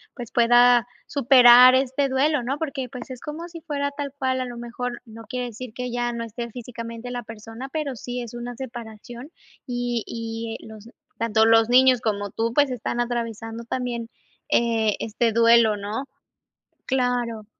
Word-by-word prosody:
pues, 240 Hz, -4 st, -8 dB
pueda 240 Hz, 0 st, +5 dB, 0.2 s
superar 255 Hz, -2 st, +7 dB
este 265 Hz, +1 st, +1 dB
duelo, 275 Hz, +2 st, +1 dB
no? 265 Hz, +4 st, -2 dB
Porque, 275 Hz, -5 st, -4 dB
pues, 250 Hz, -1 st, -9 dB
es 255 Hz, -, -7 dB
como 325 Hz, +5 st, -7 dB
si 335 Hz, -, -9 dB
fuera 285 Hz, -3 st, -3 dB
tal 285 Hz, -1 st, -5 dB
cual. 260 Hz, -1 st, 0 dB
A 255 Hz, -, -2 dB
lo 245 Hz, -, -7 dB
mejor 240 Hz, +1 st, -5 dB
no 225 Hz, 0 st, -11 dB
quiere 250 Hz, +2 st, -4 dB
decir 235 Hz, 0 st, -9 dB
que 250 Hz, +1 st, -5 dB
ya 240 Hz, 0 st, -1 dB
no 235 Hz, -, -4 dB
esté 235 Hz, +1 st, -6 dB
físicamente 230 Hz, 0 st, -7 dB
la 245 Hz, 0 st, -4 dB
persona, 225 Hz, +3 st, -9 dB
pero 280 Hz, -3 st, -4 dB
sí 245 Hz, +2 st, -5 dB
es 235 Hz, -1 st, -8 dB
una 240 Hz, 0 st, -6 dB
separación 240 Hz, 0 st, -9 dB, 0.4 s
y 245 Hz, -2 st, -2 dB
y, 225 Hz, 0 st, -5 dB
eh, -, -, -12 dB
los 220 Hz, 0 st, -12 dB, 0.3 s
tanto 220 Hz, -1 st, +2 dB
los 225 Hz, 0 st, +5 dB
niños 255 Hz, 0 st, +5 dB
como 205 Hz, -2 st, -2 dB
tú, 225 Hz, +3 st, -2 dB
pues, 285 Hz, 0 st, +3 dB
están 240 Hz, 0 st, -2 dB
atravesando 230 Hz, -1 st, -4 dB
también, 235 Hz, -1 st, -3 dB, 0.4 s
eh, 225 Hz, -3 st, +2 dB
este 225 Hz, +1 st, 0 dB
duelo, 230 Hz, -1 st, +5 dB
¿no? 210 Hz, +6 st, -4 dB, 0.8 s
Claro. 245 Hz, -4 st, -1 dB
240 Hz, 170 wpm, -24 LUFS, 230-255 Hz, 0.8 s, superar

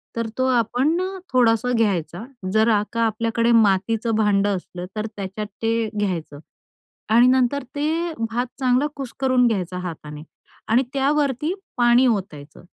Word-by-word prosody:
तर 230 Hz, -1 st, -2 dB
तो 260 Hz, -, +1 dB
आपण 250 Hz, -, +1 dB
अ, 370 Hz, -, -1 dB, 0.3 s
थोडासा 240 Hz, -1 st, +3 dB
घ्यायचा. 185 Hz, -3 st, -1 dB, 0.3 s
जर 220 Hz, +1 st, +3 dB
आ 210 Hz, -2 st, +3 dB
का 230 Hz, -, -1 dB
आपल्याकडे 230 Hz, +2 st, 0 dB
मातीचं 225 Hz, +1 st, +2 dB
भांडं 205 Hz, -2 st, +2 dB
असलं, 180 Hz, -1 st, -7 dB
तर 215 Hz, 0 st, -2 dB
त्याच्यात 200 Hz, +1 st, -5 dB
ते 225 Hz, -1 st, 0 dB
घ्यायचं 170 Hz, -7 st, -3 dB, 0.7 s
आणि 240 Hz, +2 st, +6 dB
नंतर 260 Hz, +2 st, +2 dB
ते 320 Hz, +4 st, -1 dB, 0.2 s
भात 240 Hz, +2 st, -1 dB
चांगला 255 Hz, +2 st, +2 dB
कुस्करून 260 Hz, -2 st, +1 dB
घ्यायचा 185 Hz, -5 st, -2 dB
हाताने. 155 Hz, -4 st, -7 dB, 0.4 s
आणि 235 Hz, +4 st, +3 dB
त्यावरती 285 Hz, +2 st, 0 dB, 0.2 s
पाणी 240 Hz, +1 st, +5 dB
ओतायचं, 165 Hz, -10 st, -3 dB
230 Hz, 135 wpm, -22 LUFS, 200-255 Hz, 0.7 s, आणि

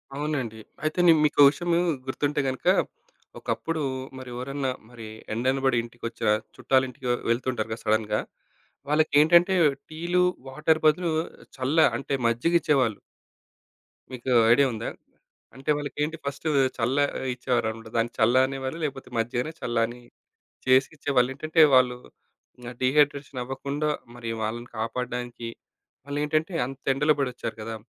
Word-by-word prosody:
అవునండి. 140 Hz, -7 st, -3 dB, 0.2 s
అయితే 155 Hz, +3 st, -1 dB
నేను 160 Hz, -2 st, +7 dB
మీకు 150 Hz, -, 0 dB
ఒక 140 Hz, -, +10 dB
విషయము 170 Hz, +3 st, 0 dB, 0.3 s
గుర్తుంటే 145 Hz, +2 st, -1 dB
గనుక, 130 Hz, -1 st, -3 dB, 0.7 s
ఒకప్పుడు 165 Hz, -1 st, -2 dB, 0.4 s
మరి 130 Hz, -1 st, -8 dB
ఎవరన్నా, 135 Hz, +1 st, -2 dB, 0.2 s
మరి 115 Hz, -3 st, -10 dB, 0.3 s
ఎండనబడి 130 Hz, +2 st, +1 dB
ఇంటికొచ్చిన, 115 Hz, -2 st, -4 dB, 0.3 s
చుట్టాలింటికి 130 Hz, +1 st, 0 dB, 0.2 s
వెళ్తుంటారు 115 Hz, -2 st, -1 dB
కదా! 115 Hz, -, -8 dB
సడెన్‌గా. 110 Hz, 0 st, +1 dB, 0.7 s
వాళ్లకేంటంటే 155 Hz, +4 st, +5 dB, 0.4 s
టీలు, 175 Hz, +3 st, 0 dB, 0.2 s
వాటర్ 155 Hz, +4 st, +1 dB
బదులు 165 Hz, +2 st, +3 dB, 0.5 s
చల్ల 135 Hz, +5 st, -1 dB, 0.2 s
అంటే 140 Hz, -, -4 dB
మజ్జిగ 120 Hz, +9 st, +1 dB
ఇచ్చేవాళ్లు. 130 Hz, -9 st, +1 dB, 1.1 s
మీకు 130 Hz, +1 st, -4 dB, 0.2 s
ఐడియా 140 Hz, +4 st, +6 dB
ఉందా? 110 Hz, +1 st, -4 dB, 0.7 s
అంటే 135 Hz, +3 st, -1 dB
వాళ్ళకేంటి 150 Hz, +2 st, -3 dB
ఫస్టు 140 Hz, +3 st, -3 dB, 0.3 s
చల్ల 125 Hz, +4 st, 0 dB, 0.4 s
ఇచ్చేవారనమాట. 115 Hz, -3 st, -2 dB
దాన్ని 115 Hz, +1 st, +1 dB
చల్ల 115 Hz, +3 st, +4 dB
అనే 135 Hz, 0 st, -5 dB
వాళ్ళు 130 Hz, +6 st, -4 dB
లేకపోతే 135 Hz, -3 st, -4 dB
మజ్జిగనే 120 Hz, +6 st, -1 dB
చల్లని 120 Hz, 0 st, -1 dB, 0.7 s
చేసి 130 Hz, +1 st, +5 dB
ఇచ్చేవాళ్ళు. 130 Hz, -3 st, +2 dB
ఏంటంటే 155 Hz, +2 st, +2 dB
వాళ్ళు 125 Hz, -1 st, +4 dB, 0.6 s
ఇంకా 120 Hz, 0 st, -8 dB
డీహైడ్రేషన్ 140 Hz, 0 st, +2 dB
అవ్వకుండా 140 Hz, +4 st, -3 dB, 0.3 s
మరి 120 Hz, -1 st, -6 dB
వాళ్ళని 120 Hz, +3 st, -4 dB
కాపాడడానికి 120 Hz, +1 st, -4 dB, 0.6 s
వాళ్ళేంటంటే 150 Hz, +4 st, -1 dB
అంతెండలో 135 Hz, +3 st, +1 dB
పడొచ్చారు 125 Hz, -4 st, -3 dB
కదా! 115 Hz, +1 st, -5 dB
130 Hz, 120 wpm, -26 LUFS, 120-150 Hz, 1.1 s, ఒక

